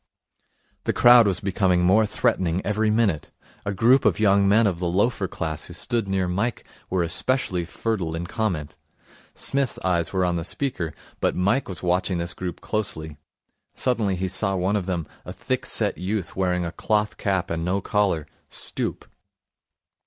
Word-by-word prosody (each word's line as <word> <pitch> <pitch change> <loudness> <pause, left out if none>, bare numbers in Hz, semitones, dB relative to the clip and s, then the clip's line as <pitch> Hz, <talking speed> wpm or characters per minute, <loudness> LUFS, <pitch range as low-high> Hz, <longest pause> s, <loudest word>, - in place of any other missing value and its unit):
The - - +1
crowd 120 -2 +7
was 95 -3 0
becoming 95 -2 +2
more 105 +5 +4
threatening 90 -3 +1
every 105 +2 +1
minute. 105 -8 +1 0.4
A - - +1
group 120 +7 +4
of - - +2
young 100 -2 +4
men 110 +3 +5
of 90 -5 0
the 90 - -1
loafer 100 +3 +1
class 80 -4 -4
who 85 - -10
stood 115 +3 -1
near 95 -1 0
Mike 105 +6 -1 0.3
were 90 -2 +1
especially 90 0 0
fertile 90 -2 -2
in 85 +1 -4
comment. 90 -8 -2 0.6
Psmith's 140 -3 0
eyes 85 -2 +1
were 95 -1 +1
on 90 -1 0
the 85 - -3
speaker; 85 - -3 0.2
but - - +1
Mike 100 +8 +1
was 90 -3 -6
watching 90 +1 +1
this 85 +1 -2
group 90 -2 -6
closely. 80 -8 -3 0.6
Suddenly 115 -7 0
he 95 +1 -2
saw 95 +1 0
one 95 +3 0
of 100 -3 -1
them, 85 -4 -2 0.2
a - - -8
thick - - -3
set - - 0
youth 95 0 -3
wearing 90 -2 0
a 85 - -3
cloth 105 +3 0
cap 95 -4 -1
and 80 0 -2
no 90 +3 0
collar, 100 -6 0 0.2
stoop. - - -3
95 Hz, 170 wpm, -24 LUFS, 90-105 Hz, 0.6 s, crowd